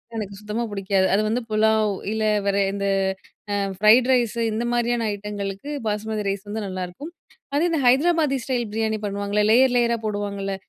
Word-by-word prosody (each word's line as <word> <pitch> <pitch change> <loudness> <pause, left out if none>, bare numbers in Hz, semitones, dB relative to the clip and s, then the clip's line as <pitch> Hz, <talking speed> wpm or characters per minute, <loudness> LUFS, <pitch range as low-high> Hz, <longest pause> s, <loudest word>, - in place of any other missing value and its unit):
எனக்கு 205 -3 -4
சுத்தமா 210 +3 -3
பிடிக்காது. 195 -1 +1
அது 200 - +3
வந்து 230 +3 0
புலாவ் 215 0 +2 0.2
இல்ல 220 0 -1 0.2
வேற 200 0 +1 0.2
இந்த 200 0 -3 0.7
அ - - +1 0.2
ஃப்ரைட் 220 +5 +6
ரைஸ், 240 -3 +1
இந்த 220 +2 -2
மாதிரியான 240 -1 0
ஐட்டங்களுக்கு 200 +3 -5 0.2
பாஸ்மதி 215 +1 -2
ரைஸ் 195 +1 -3
வந்து 215 +2 -4
நல்லாயிருக்கும். 185 - -6 0.4
அதே 305 +4 +2
தான் 300 -4 0
ஹைதராபாதி 295 +2 +3
ஸ்டைல் 245 -3 -1
பிரியாணி 220 0 -1
பண்ணுவாங்கல்ல, 205 +1 -1
லேயர் 250 +3 +5
லேயரா 235 -1 +2
ஆ - - -18
போடுவாங்கல்ல 200 -2 -3
215 Hz, 165 wpm, -23 LUFS, 200-240 Hz, 0.7 s, ஃப்ரைட்